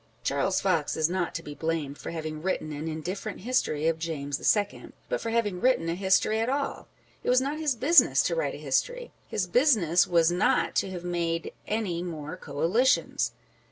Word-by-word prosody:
Charles 140 +8 +1
Fox 165 -6 0
is 160 +1 +2
not 180 -2 -2
to 165 - -4
be 145 - -7
blamed 160 -2 -2
for - - -8
having 155 -2 -5
written 160 -3 -2
an 150 +2 -5
indifferent 180 +7 -5
history 175 -10 0
of 165 0 +1
James 145 -4 -3 0.2
II., 205 -1 -4 0.2
but - - -1
for 230 - -3
having 210 -5 0
written 250 -9 +2
a - - 0
history 190 +4 +2
at 225 +2 0
all. 280 +1 -2 0.4
It - - -1
was 250 0 +5
not 280 +4 -2
his 300 -5 0
business 285 +9 +5
to - - 0
write - - -1
a - - -7
history - - -1 0.2
â€" - - -35
his 190 - -1
business 185 - +3
was 170 -1 +3
not 180 +3 +2
to 195 - +1
have 180 -2 -6
made 170 -1 -2
any 205 -6 -1
more 160 -2 -5
Coalitions 180 - +1
180 Hz, 195 wpm, -27 LUFS, 160-225 Hz, 0.4 s, was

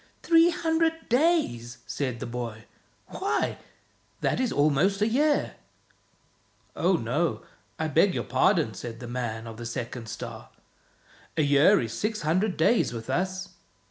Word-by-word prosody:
"Three 330 0 +6
hundred 325 0 0
days!" 245 - +1
said 130 -5 -3
the - - -4
boy. 115 -2 -6 0.4
"Why, 395 +2 -1 0.6
that - - +1
is 255 -2 0
almost 155 +7 +2
a 210 - +2
year." 290 +6 +1 0.6
" - - -38
Oh, - - +2
no, - - 0 0.3
I 160 - -1
beg 165 +6 +3
your - - -1
pardon," 165 - +2
said 115 +4 -7
the 120 - -7
man 120 -2 -4
of 115 -1 -8
the 120 - -7
second 120 0 -5
star, 115 - -7 0.4
" - - -29
a 155 - +3
year 145 +8 +5
is 115 -1 -3
six 215 - -2
hundred 185 +6 +1
days 165 - +3
with 115 -1 -5
us." 185 +1 -2
160 Hz, 150 wpm, -27 LUFS, -, 0.6 s, Three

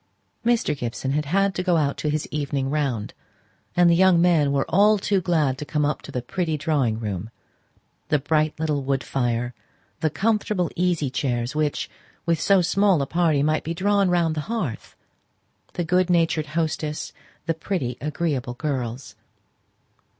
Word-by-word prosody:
Mr. 230 -10 +2
Gibson 130 0 -3
had 150 +1 0
had 195 +6 +2
to 185 - -2
go 180 -2 +2
out 140 -3 +1
to 150 - -2
his 150 0 -1
evening 140 -2 -2
round; 135 -8 -1 0.6
and 175 0 +5
the 170 - +5
young 185 -1 +5
men 165 -5 +3
were 140 -1 +1
all 210 +4 +4
too 200 -1 +1
glad 155 -7 +1
to - - -3
come 150 +1 0
up 150 - 0
into - - -11
the 125 - -3
pretty 160 +2 -2
drawing 140 -8 0
room; 105 -2 -4 0.8
the 150 - +3
bright 155 +2 0
little 150 -3 0
wood 135 0 -1
fire; 120 -2 -1 0.5
the 160 -1 +1
comfortable 210 -1 0
easy 170 -6 0
chairs 120 -1 -1
which, 150 -1 -1 0.4
with 165 -1 +1
so 195 -2 +4
small 195 0 +3
a - - -1
party, 160 -2 +2
might 155 +1 +1
be 165 +2 -3
drawn 200 +1 +2
round 170 -2 +2
the 155 - -2
hearth; 180 - -4 0.8
the 175 - -2
good 180 +2 +2
natured 165 -3 +2
hostess; 155 -2 -2 0.3
the 165 - +1
pretty, 160 - -3
agreeable 145 -5 -2
girls. 130 -3 -4
155 Hz, 165 wpm, -24 LUFS, 140-175 Hz, 0.8 s, and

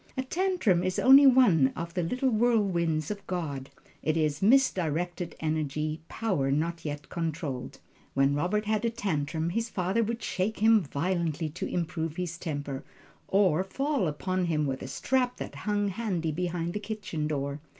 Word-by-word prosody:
A 260 - 0
tantrum 335 - +1
is 185 0 -1
only 275 +2 +8
one 225 - +6
of 170 +1 -5
the 180 - 0
little 250 +10 0
whirlwinds 195 -9 +1
of 200 -1 -7
God 145 -7 -3 0.3
it 155 +1 0
is 150 -2 0
misdirected 180 - +2
energy, 155 0 -2
power 185 -12 -1
not 165 +3 -1
yet 145 -2 -5
controlled. 160 -6 -4 0.4
When 135 +1 +3
Robert 180 +9 0
had 215 0 0
a 230 - +2
tantrum, 165 -6 -2
his 230 +4 -1
father 190 +5 0
would 230 +1 -3
shake 200 +4 -1
him 220 0 +5
violently 165 +1 -1
to 155 - -5
improve 165 -2 -2
his 175 -2 -4
temper, 145 -4 -4 0.4
or 185 -3 +3
fall 270 - -1
upon 185 +5 -1
him 155 -3 0
with 135 -2 -3
a - - -5
strap 250 - 0
that - - -6
hung 205 -1 -1
handy 185 -6 -2
behind 175 +1 -2
the 210 - -2
kitchen 200 -7 -4
door. 140 -1 -2
175 Hz, 160 wpm, -28 LUFS, 155-210 Hz, 0.4 s, only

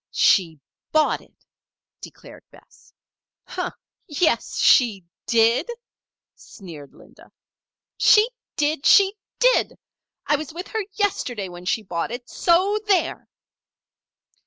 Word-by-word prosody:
"She 165 -6 +2 0.3
bought 310 -1 +1
it," - - -26 0.6
declared - - -13
Bess. - - -22 1.2
"Yes 315 +3 0
she 215 -8 +3 0.2
did!" 230 - +2 0.6
sneered 160 -8 -13
Linda. - - -19 0.7
"She 425 +1 +5 0.3
did! 295 -1 -1
she 395 -1 +6 0.2
did! - - +2 0.5
I 300 - +2
was 305 +1 -8
with 355 +2 -7
her 440 -2 -3
yesterday 245 - -2
when 175 0 -11
she 220 +4 -1
bought 170 -1 -4
it! 245 +1 -7
So 375 +5 +1
there!" 380 -4 0
275 Hz, 105 wpm, -22 LUFS, -, 1.2 s, she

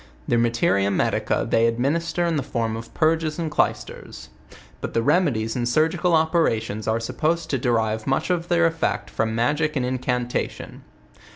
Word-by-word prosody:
Their 120 - +2
mate 115 0 0
ria 100 +1 +3
medica 100 - 0
they 115 +1 +3
administer 155 +9 0
in 170 -1 0
the 145 - 0
form 115 -5 -2
of 115 0 -8
purges 160 -1 +1
and 165 -3 -3
clys - - +1
ters; - - -11 0.5
but - - -5
the 115 - +2
remedies 115 -10 +1
and 120 -1 -1
surgical 160 +5 +2
operations 115 - 0
are 110 +1 +1
supposed 160 +8 -1
to 135 - 0
derive 110 -3 0
much 135 +6 0
of 175 -1 -1
their 170 -1 +3
effect 165 0 -1
from 110 0 -1
magic 150 +6 0
and 130 -3 0
incantation. 125 -1 -3
130 Hz, 170 wpm, -23 LUFS, 115-160 Hz, 0.5 s, ria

